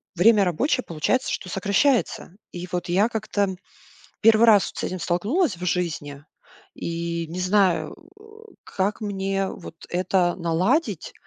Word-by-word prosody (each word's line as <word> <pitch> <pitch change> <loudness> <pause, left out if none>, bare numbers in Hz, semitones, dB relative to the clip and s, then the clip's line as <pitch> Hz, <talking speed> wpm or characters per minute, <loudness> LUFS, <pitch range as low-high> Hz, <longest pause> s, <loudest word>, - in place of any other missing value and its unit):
время 205 +3 +5
рабочее 255 - 0
получается, 170 +11 0
что 185 - -4
сокращается. 200 - +1 0.2
И 180 +1 -7
вот 180 -1 -3
я 200 +5 +3
как-то 205 -4 -1 0.7
1 225 +1 +6
раз 205 -4 +6
вот - - -17
с - - -4
этим 185 0 -3
столкнулась 205 - 0
в 180 - -6
жизни 150 -5 -3 0.5
и 170 0 -4
не 175 +3 -6
знаю, 185 -1 +2 0.2
о, 435 +1 -16 0.2
как 200 +3 -2
мне 195 -1 -2
вот 165 - -10
это 180 0 +1
наладить. 190 - 0
190 Hz, 140 wpm, -24 LUFS, 175-220 Hz, 0.7 s, 1